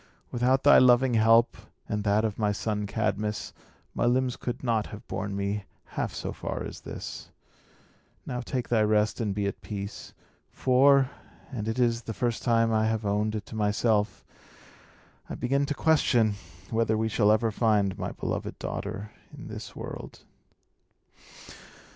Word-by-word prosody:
Without 125 +2 +2
thy 145 - +8
loving 125 0 +5
help, 115 +1 +5 0.3
and 105 -1 -2
that 105 +1 +2
of 110 -1 -3
my 105 -1 +2
son 105 0 -2
Cadmus, 105 0 -2 0.4
my - - 0
limbs 125 0 +2
could 120 - -5
not 115 -4 +1
have 105 - -10
borne 100 +1 -3
me 100 +1 -2 0.2
half - - -2
so - - -5
far - - -4
as - - -8
this. - - -7 1.0
Now, 125 0 -3
take 125 0 -3
thy 115 -2 +3
rest, 105 +1 +2
and 105 -3 -1
be 100 -1 -1
at 100 - -3
peace. 100 -1 -7 0.3
For 135 +1 +4 0.4
and 110 -5 -4
it 110 +2 -2
is 120 -2 +2
the 110 -2 -6
first 120 +2 -1
time 115 -1 +2
I 110 0 +2
have 110 -1 -1
owned 105 +2 0
it 105 -2 -4
to - - -10
myself 105 0 +1 1.0
I - - -4
begin 140 +3 0
to 145 - -2
question 125 -9 +3 0.4
whether 110 -1 +1
we 110 +1 +1
shall 105 -1 +3
ever 110 +1 +2
find 105 -3 +2
my - - -3
beloved - - -4
daughter 105 +2 -5 0.2
in - - -10
this - - -8
world." - - -8
110 Hz, 160 wpm, -27 LUFS, 105-120 Hz, 1.0 s, thy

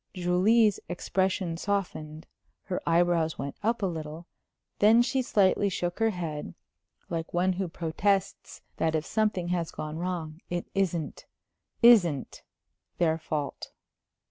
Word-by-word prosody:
Julie's 190 +5 +3
expression 180 -1 -1
softened; 165 -5 -3 0.4
her 180 - -3
eyebrows 170 -1 +2
went 140 0 -5
up 225 0 0
a - - +3
little; 160 -1 -5 0.5
then 225 +3 +6
she 265 +1 0
slightly 200 -3 +2
shook 175 0 -3
her 225 0 +3
head, 160 - -5 0.6
like 165 0 -4
one 185 +2 +2
who 185 +1 -2
protests 190 +4 -1
that 160 0 +1
if 155 0 -1
something 210 -5 0
has 175 -2 -1
gone 155 +1 -6
wrong, 170 -2 -4
it 175 0 -2
isn't 175 -5 -2 0.6
isn't 175 - +5 0.6
their 165 -2 +2
fault. 150 -3 -4
175 Hz, 125 wpm, -28 LUFS, 160-195 Hz, 0.6 s, then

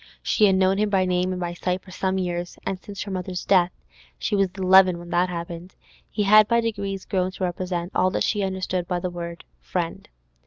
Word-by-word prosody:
She 215 - +3
had 195 -2 +4
known 190 +1 +3
him 210 0 +2
by 190 -2 +2
name 180 0 0
and 185 - -3
by 175 -1 -3
sight 180 +1 -2
for 185 - -14
some 190 +1 -1
years, 175 -1 -3
and 190 - -2
since 200 0 -7
her 200 - -7
mother's 180 -1 -4
death 185 -2 +4 0.5
(she 210 - -1
was 195 -2 +2
eleven 185 -1 +6
when 175 0 -10
that 175 +1 +2
happened) 170 +1 -6 0.3
he 210 - -1
had 215 +1 +7
by 235 +1 +3
degrees 200 -4 -3
grown 185 -3 0
to 190 - -5
represent 180 0 -2
all 185 - +3
that - - -1
she 210 - 0
understood 185 -2 -2
by 180 -1 -1
the 180 0 -3
word 170 -1 -7 0.2
'friend. - - -4
185 Hz, 220 wpm, -24 LUFS, 175-195 Hz, 0.5 s, had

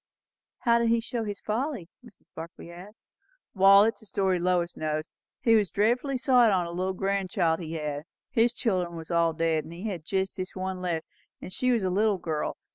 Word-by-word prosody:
"How 235 -2 +4
did 235 - +1
he 230 0 +3
show 230 0 -4
his 205 -1 -5
folly?" 230 - -3 0.2
Mrs. 235 -6 -17
Barclay 170 +1 -9
asked. 190 +6 -13 0.5
"Wall, 195 0 +7
it's 225 +1 0
a 220 - -14
story. 190 -2 +1
Lois 175 -1 0
knows. 155 +1 -3 0.3
He 230 - +4
was 210 -4 +3
dreadfully 240 - +1
sot 250 -3 +4
on 185 -3 +2
a 170 - -6
little 185 +2 -2
grandchild 190 -3 0
he 165 -2 -6
had; 150 -2 -4 0.3
his 235 +1 +2
chil'n 180 -6 -1
was 165 0 -8
all 170 -1 +2
dead, 160 -1 0
and 160 +2 -10
he 180 +6 -6
had 175 -6 -5
jest 190 +2 -2
this 185 -1 -5
one 185 0 -4
left; 170 -3 -2 0.4
she 255 +7 -1
was 230 -4 +1
a 185 - 0
little 205 +1 +2
girl. 160 -3 -3
190 Hz, 200 wpm, -27 LUFS, 170-220 Hz, 0.5 s, Wall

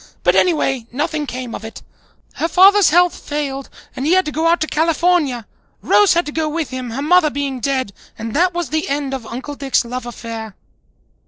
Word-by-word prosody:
But - - +4
anyway, 270 -8 +1
nothing 300 +3 -2
came 250 -2 -6
of - - -7
it. 220 0 -9 0.5
Her 330 - -1
father's 390 +4 +6
health 350 +2 +4
failed 280 -2 -4 0.3
and 260 - -4
he 315 +5 +2
had 375 0 +3
to 300 - -3
go 320 +2 0
out 340 +1 +3
to - - +2
California. 315 -6 +1 0.4
Rose 410 -4 +4
had 345 - +2
to 295 - -5
go 315 0 -1
with 315 -2 -3
him, 255 -1 -5
her 260 +5 -4
mother 340 0 +4
being 280 -2 -3
dead, 260 -4 -1 0.2
and 225 0 -5
that 360 +4 +3
was 345 -2 -3
the 315 -1 -1
end 280 -1 -2
of 250 -4 -5
Uncle 255 +5 -6
Dick's 275 -3 0
love 250 +1 -5
affair." 225 -3 -7
290 Hz, 200 wpm, -18 LUFS, 255-330 Hz, 0.5 s, father's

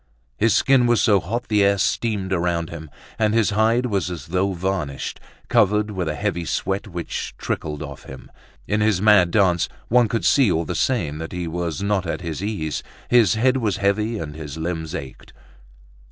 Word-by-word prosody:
His 110 - +2
skin 135 -3 +4
was 120 -1 +3
so 105 -4 +4
hot 115 +8 -4
the 105 -2 +3
air 100 0 +3
steamed 100 -2 -1
around 85 -2 -1
him; 80 -2 -8 0.3
and 110 0 +2
his 115 -2 +3
hide 110 +4 +2
was 100 -7 -1
as 85 -2 -7
though 95 +2 0
varnished, 90 -6 -3 0.3
covered 105 +1 +2
with 95 -4 -3
a 75 - -2
heavy 100 -3 -2
sweat 95 +5 -2
which 85 -4 -5
trickled 75 -1 -4
off 70 -3 -9
him. 65 - -11 0.4
In 105 +1 0
his 105 -4 +2
mad 100 -4 +5
dance, 90 -2 +2 0.2
one 120 0 +4
could 115 +2 -2
see 135 -8 +4
all 85 0 0
the - - -3
same 80 - 0
that 80 - -6
he 90 -1 -3
was 85 0 -3
not 100 -3 0
at - - -3
his 85 -1 -5
ease, 95 -8 -2 0.3
his 120 -3 +5
head 130 +4 +3
was 110 -6 0
heavy 105 +3 0
and 75 -6 -5
his 75 -1 -7
limbs 80 0 -4
ached. 70 -6 -9
95 Hz, 190 wpm, -22 LUFS, 85-110 Hz, 0.4 s, mad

